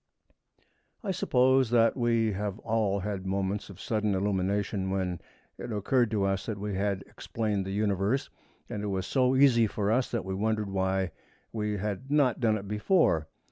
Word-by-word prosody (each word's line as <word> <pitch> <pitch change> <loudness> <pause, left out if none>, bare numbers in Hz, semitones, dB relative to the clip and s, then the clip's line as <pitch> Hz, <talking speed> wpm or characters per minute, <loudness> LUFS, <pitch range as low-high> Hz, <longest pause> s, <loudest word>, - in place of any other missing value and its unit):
I 200 - -1
suppose 130 -7 +3
that 115 -1 +4
we 115 -3 +2
have 100 0 -3
all 110 -3 0
had 100 -1 -3
moments 100 +1 -2
of 95 -2 -11
sudden 105 -2 0
illumination 95 0 0
when 95 -2 -2 0.4
it - - -6
occurred 115 +3 +1
to 105 -2 0
us 95 0 -1
that 110 -3 -3
we 105 0 -4
had 100 0 -1
explained 105 -4 -3
the - - -3
Universe, 100 +4 0 0.4
and 105 - -5
it 105 - -3
was 95 -2 -2
so 130 +2 +2
easy 130 -4 +5
for 105 0 -1
us 125 +3 +1
that 115 -5 -3
we 95 - -3
wondered 105 0 -1
why 95 -1 0 0.4
we 105 -2 -1
had 105 +6 -4
not 140 -5 +3
done 110 -3 +2
it 100 -1 -8
before. 105 - +2
105 Hz, 175 wpm, -29 LUFS, 95-115 Hz, 0.4 s, easy